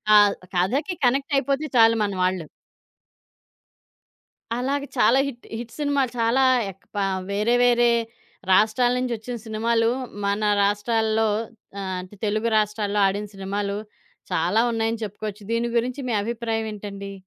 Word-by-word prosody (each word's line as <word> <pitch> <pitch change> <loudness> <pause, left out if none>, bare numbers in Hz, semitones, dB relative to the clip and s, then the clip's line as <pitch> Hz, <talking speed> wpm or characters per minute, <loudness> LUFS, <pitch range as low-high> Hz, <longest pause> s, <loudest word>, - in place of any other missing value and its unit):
ఆహ్, 205 -1 +6 0.2
కథకి 265 - 0
కనెక్ట్ 270 +3 +1
అయిపోతే 275 +2 0
చాలు 225 0 +6
మనవాళ్ళు. 185 -4 -1 2.1
అలాగ 270 +4 -1
చాలా 245 +1 +5
హిట్ 245 -3 -10
హిట్ 235 0 -7
సినిమాలు, 285 -3 +1
చాలా 230 +4 +3 0.3
అక్ 195 +1 -17
పా 200 - +1
ఆహ్, 190 - -3
వేరే 210 +4 +1
వేరే 240 0 +4 0.6
రాష్ట్రాల 220 +5 +4
నుంచొచ్చిన 245 -1 -3
సినిమాలు 225 +1 +1 0.4
మన 205 +1 +1
రాష్ట్రాల్లో, 220 +2 +1 0.5
ఆహ్, 195 - -4
అంటే 185 +3 -11
తెలుగు 215 +2 0
రాష్ట్రాల్లో 210 -1 0
ఆడిన 200 +2 -1
సినిమాలు 200 +1 -3 0.5
చాలా 180 +7 +2
ఉన్నాయని 225 0 -1
చెప్పుకోవచ్చు. 210 0 -6
దీని 230 +1 0
గురించి 245 +4 0
మీ - - 0
అభిప్రాయమేంటండి? 215 -3 -4
220 Hz, 120 wpm, -24 LUFS, 205-240 Hz, 2.1 s, ఆహ్